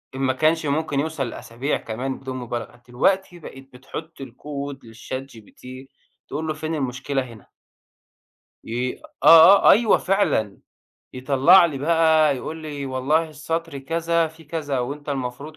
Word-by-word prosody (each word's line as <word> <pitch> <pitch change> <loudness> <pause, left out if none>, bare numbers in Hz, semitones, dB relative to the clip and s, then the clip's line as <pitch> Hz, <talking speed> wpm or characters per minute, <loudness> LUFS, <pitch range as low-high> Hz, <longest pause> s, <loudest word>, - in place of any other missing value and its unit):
إن - - -6
ما 130 -1 +1
كانش 155 +3 +1
ممكن 145 0 -1
يوصل 145 -4 -2
لأسابيع 120 +5 -4
كمان 130 +4 -5
بدون 130 -1 -6
مبالغة، 120 0 -6
دلوقتي 175 +8 0
بقيت 135 -3 -12
بتحط 140 +4 -9
الكود 140 +2 -7
لChatGPT 115 0 -9 0.7
تقول 155 +3 -4
له: 155 - -1
فين 155 +1 -4
المشكلة 135 0 -2
هنا؟ 115 -6 -12 1.2
ي 125 - -3 0.2
آه، 165 +5 +8
آه، - - +10
أيوه 220 -1 +4
فعلًا، 180 - 0 0.6
يطلّع 135 +7 +5
لي 145 -5 -5
بقى 160 -1 +3
يقول 155 +5 -6
لي 145 -3 -6
والله 140 +5 0
السطر 160 0 -4
كذا 165 +3 0
في 160 +1 -17
كذا 145 -3 -3
وأنت 145 +4 -5
المفروض 140 +3 -5
140 Hz, 140 wpm, -22 LUFS, 130-160 Hz, 1.2 s, آه